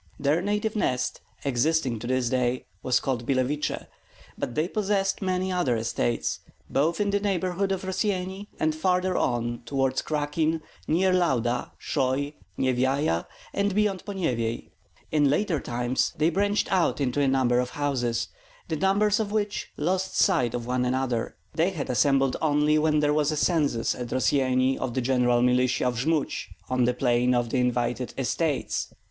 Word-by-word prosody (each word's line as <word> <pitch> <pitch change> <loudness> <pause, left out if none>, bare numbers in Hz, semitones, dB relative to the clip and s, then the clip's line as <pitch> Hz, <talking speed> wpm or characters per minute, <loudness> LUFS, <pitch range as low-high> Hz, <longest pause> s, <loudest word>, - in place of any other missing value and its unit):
Their 145 +4 +2
native 210 +3 -1
nest, 125 -10 -1 0.2
existing 135 -2 +1
to 120 - -6
this 130 -1 +1
day, 125 0 0 0.2
was 125 -1 +2
called 125 -3 -2
Billeviche; 135 +3 0 0.5
but 120 - -4
they 155 +2 +1
possessed 195 -1 0
many 185 0 0
other 175 -10 +1
estates, 110 - -1 0.3
both 160 +5 +1
in 205 -1 +1
the 200 - +2
neighborhood 195 -1 0
of 190 -1 -2
Rossyeni 190 +1 -2
and 155 0 +2
farther 180 +3 +1
on 120 -1 0
toward 135 -1 0
Krakin, 155 +1 -1 0.2
near 185 +4 +3
Lauda, 125 -9 +1
Shoi, 135 +3 -1 0.2
Nyevyaja, 130 - +1 0.3
and 200 -1 0
beyond 210 -3 +1
Ponyevyej. 125 - -2 0.4
In 145 -2 +3
later 165 +1 +1
times 120 +1 -1
they 155 +3 +3
branched 205 +4 +1
out 185 -5 +2
into 140 +1 0
a 140 - +3
number 130 -2 +3
of 125 0 -1
houses, 125 -5 -1 0.4
the 160 - -1
members 205 +4 +2
of 210 -2 -2
which 210 -1 -1
lost 185 +5 -1
sight 160 - +3
of 120 -1 -4
one 125 +1 0
another. 125 -2 -1 0.2
They 170 +5 +1
all 140 - -2
assembled 135 0 +2
only 150 0 +3
when 150 -1 +2
there 150 0 +2
was 150 0 +2
a 155 - -2
census 145 -8 +1
at 125 -1 -6
Rossyeni 130 +1 +2
of 125 -3 -3
the 130 - +1
general 125 -1 +2
militia 125 0 +2
of 125 -2 0
Jmud 155 +2 +1 0.4
on 125 -1 +3
the 125 0 +1
plain 125 0 +2
of 120 -1 0
the 130 - +1
invited 125 0 -1
Estates. 140 +3 -1
145 Hz, 160 wpm, -26 LUFS, 125-180 Hz, 0.5 s, near